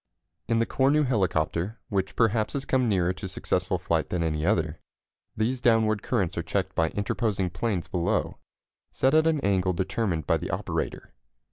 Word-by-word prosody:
In 115 0 +2
the 115 - +2
Cornu 140 +5 +2
helicopter, 95 -2 0
which 95 -1 -1
perhaps 110 -2 +2
has 135 -1 -2
come 130 -3 +2
nearer 90 -3 +2
to 95 +1 -6
successful 90 0 -1
flight 85 -3 -1
than 90 -2 -1
any 75 -2 -1
other, 85 -5 +1 0.6
these 120 +4 0
downward 110 -3 +3
currents 90 -4 -1
are - - 0
checked - - -2
by 80 -1 +1
interposing 100 -2 -1
planes 95 0 -2
below, 85 -2 -1 0.5
set 130 - +2
at 155 +1 +5
an 160 -2 +2
angle 95 -3 +1
determined 95 -3 -1
by - - +2
the - - -5
operator. - - -3
100 Hz, 165 wpm, -27 LUFS, 90-115 Hz, 0.6 s, at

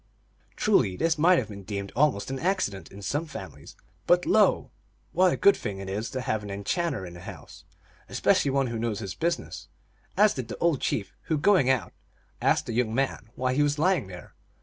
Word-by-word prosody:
Truly 125 - +2
this 165 -1 +1
might 175 +3 +5
have - - -1
been 100 -1 -8
deemed 100 0 -5
almost 135 -5 +1
an 135 - -3
accident 155 - -1
in 100 +1 -11
some 145 - -2
families; 150 - -10 0.3
but - - +4
lo! - - +3 0.4
what 185 0 +4
a - - -1
good 200 - +5
thing 105 -4 -5
it 95 0 -7
is 105 +4 -3
to 130 - -4
have 110 -4 -1
an 105 - -8
enchanter 100 - -2
in 85 - -9
the 85 - -10
house, 90 -6 -11 0.4
especially 140 - +2
one 135 0 +1
who 115 -2 -3
knows 115 -2 -1
his 100 -3 -5
business, 170 +1 -3 0.5
as 210 0 +5
did 130 -5 -5
the - - -6
old 170 -5 +1
chief, 100 -4 -2
who, 160 - 0
going 150 -4 +4
out, 125 -9 0 0.5
asked - - +2
the 115 - -4
young 115 -1 0
man 135 -4 -1
why 130 0 0
he 145 - +2
was 145 0 +1
lying 175 - +2
there. 90 -3 -11
125 Hz, 205 wpm, -27 LUFS, 100-160 Hz, 0.5 s, might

